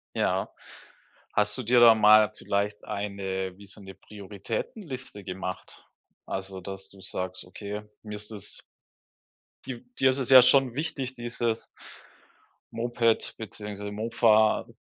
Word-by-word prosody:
Ja. - - 0 0.8
Hast 105 0 +2
du 130 - -3
dir 120 +2 +4
da 120 -1 +9
mal 110 0 +6
vielleicht 100 +1 -2
eine 95 -2 -3
wie 100 0 -14
so 100 - -8
'ne 95 -1 -11
Prioritätenliste 110 - -6
gemacht? 90 -1 -6 0.4
Also, 95 0 -5
dass 95 +1 -7
du 100 - -17
sagst: 95 0 -4
„Okay, 100 +3 -7 0.2
mir 105 -1 -6
ist 105 +1 -10
das“ 105 -2 -9 1.1
Di - - -6 0.2
dir 130 - +5
ist 130 - -3
es 130 - -2
ja 130 -1 +11
schon 130 -1 +4
wichtig, 135 -3 -3
dieses 120 -1 -2 1.1
Moped 115 -1 0
beziehungsweise 105 -1 -6
Mofa 110 0 +3
105 Hz, 130 wpm, -27 LUFS, 100-120 Hz, 1.1 s, ja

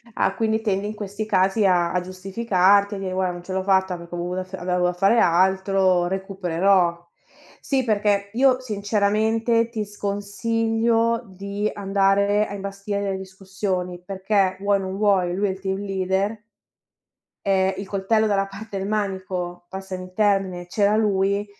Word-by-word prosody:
Ah 195 - +1
quindi 220 +1 +1
tendi 205 -3 -1
in 215 - -5
questi 205 +1 -5
casi 195 +1 +2
a 175 -2 +2
a 180 - +1
giustificarti 195 +1 +2
a - - -5
dire:"Guarda 185 -1 -1
non 175 0 -8
ce 185 - -6
l'ho 190 0 -1
fatta 190 -1 +2
perché 170 0 -12
ho - - -4
avut 180 +2 -4
avevo 180 -1 -2
dovuto 180 0 +2
fare 195 +5 +4
altro, 190 -1 +3
recupererò". 185 -2 +1 0.5
Sì 265 -3 0
perché 205 -2 +1
io 255 +1 +4
sinceramente, 220 +1 +1
ti 220 -3 -3
sconsiglio 225 +3 0
di 200 +2 -4
andare 200 +1 +2
a - - -7
imbastire 200 +1 -4
delle 195 -1 -2
discussioni 190 -1 -4
perché 195 0 0
vuoi 200 +1 +2
o - - -4
non 190 0 -4
vuoi, 195 -4 +2
lui 205 +2 +1
è - - 0
il 190 - -7
team 190 0 -2
leader. 195 +2 -2 1.0
Eh, 190 -1 +2
il 195 0 -6
coltello 210 +3 +1
dalla 200 -2 +1
parte 200 +1 -8
del 195 0 -3
manico, 190 -4 -3
passami 190 0 -6
il 185 - -15
termine, 195 -4 +1
c'era 205 +3 +2
lui 200 -1 +1
195 Hz, 160 wpm, -23 LUFS, 190-205 Hz, 1.0 s, fare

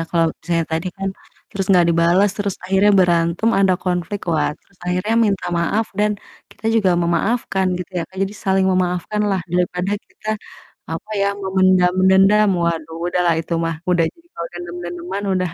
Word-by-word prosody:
kalau 165 -1 +3
misalnya 165 -1 0
tadi 165 +3 -1
kan, 195 0 -2 0.4
terus 195 -1 -2
nggak 180 -3 +5
dibalas, 170 +4 +3
terus 200 -2 -2
akhirnya 195 +2 +3
berantem 170 +3 +2
ada 190 -2 +4
konflik, 180 +2 -2
wah, 155 - +1
terus 200 - -32
akhirnya 180 +5 0
minta 195 -2 -1
maaf, 210 +6 0
dan 210 0 +3 0.4
kita - - -21
juga 215 -5 +3
memaafkan 190 +3 0
gitu 180 - -7
ya, - - -1
Kak. 190 - -19
Jadi 195 +1 -2
saling 190 -1 +2
memaafkan 185 +3 -1
lah, 190 -1 0
daripada 180 +2 0
kita, 215 - -12 0.6
apa 165 +6 -6
ya, 200 - +2
memendam 185 -2 +2
dendam, 195 +2 +5
waduh, 165 -1 -2
udahlah 175 -1 +2
itu 165 - -7
mah, 165 -1 -2
udah 175 -2 +3
jadi 335 - -7
kalau 170 0 -5
dendam-dendaman 175 +2 -6
udah 185 -1 0
185 Hz, 165 wpm, -20 LUFS, 170-195 Hz, 0.6 s, nggak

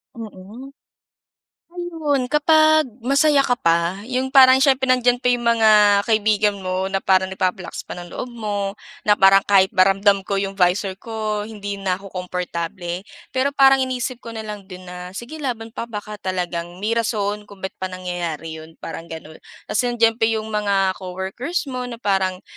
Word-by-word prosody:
Mhm. 225 +4 -10 1.0
Ah 355 - -9
yun 310 -7 -1
kapag, 310 +2 +4 0.2
masaya 280 +4 +3
ka 245 - +2
pa, 170 -1 0
yung 255 +3 -2
parang 265 -1 +7
siyempre 265 -1 +3
nandiyan 245 0 +2
pa 250 - +4
yung 240 -1 0
mga 230 -2 +4 0.3
kaibigan 210 -2 +1
mo, 185 0 -2
na 195 - 0
parang 190 0 +2
nagpapalakas 185 -1 -3
pa - - -6
ng 175 -1 -9
loob - - -5
mo, 205 -4 -4 0.3
na 210 - +6
parang 195 0 +6
kahit 190 -2 +4
ba 185 0 +5
ramdam 195 +1 +3
ko 200 - -1
yung 195 0 -1
'visor 190 0 0
ko, 215 -2 -3
hindi 205 -2 -6
na 190 -2 0
ako 195 +1 -12
komportable. 180 0 -4 0.2
Pero 275 +2 0
parang 270 -1 +6
iniisip 255 -1 -2
ko 230 -2 -9
na 220 - -5
lang 210 -2 -8
din 185 -1 -10
na, 180 0 -9
"Sige 240 +9 -8
laban 230 -5 -4
pa, 230 - -6
baka 210 -1 -7
talagang 175 -2 -3
may 215 - 0
rason 210 -3 -1
kung 200 -2 -15
ba't 190 - -3
pa 185 - -2
nangyayari 175 -3 -5
yun," 160 +1 -13
parang 165 0 -7
gano’n. 160 -1 -10 0.2
Kasi 245 +4 -1
andiyan 225 0 +3
pa 225 - +3
yung 220 -1 -2
mga 200 -2 +1
coworkers 190 - -4
mo, 250 -1 -4
na 240 - -6
parang 190 -4 -1
205 Hz, 180 wpm, -21 LUFS, 185-245 Hz, 1.0 s, parang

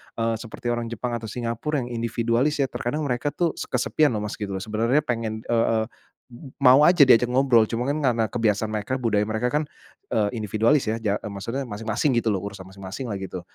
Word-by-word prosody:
eee, 115 0 0
seperti 115 +1 -6
orang 120 0 -2
Jepang 120 +1 -3
atau 115 - -8
Singapura 120 +6 -2
yang 120 - -7
individualis 120 +5 0
ya. 135 - -2
Terkadang 145 +6 -3
mereka 140 +1 -1
tuh 170 -2 +1
se - - -4
kesepian 130 +2 +1
loh 105 - -2
Mas 105 - -5
gitu, 100 -3 -4
sebenarnya 115 +7 +1
pengen 115 -4 -3
eee, 115 -1 +2 0.8
mau 140 +2 +7
aja 175 -2 +5
diajak 125 -3 +6
ngobrol, 125 -3 +4
cuman 115 +3 -3
kan 155 - -2
karena 115 -1 +1
kebiasaan 110 -1 0
mereka, 110 +5 -3
budaya 105 -3 +1
mereka 110 +3 -1
kan 150 +3 0 0.5
eee 105 -2 +2
individualis 110 +7 +2
ya, 110 - +1
ja 105 -2 0
e - - -12
maksudnya 115 +7 -4
masing-masing 115 +4 -1
gitu 115 - 0
loh, 100 - +1
urusan 95 -2 -8
masing-masing 100 +6 -7
lah 100 - -2
gitu. 95 -2 -6
115 Hz, 200 wpm, -24 LUFS, 110-130 Hz, 0.8 s, mau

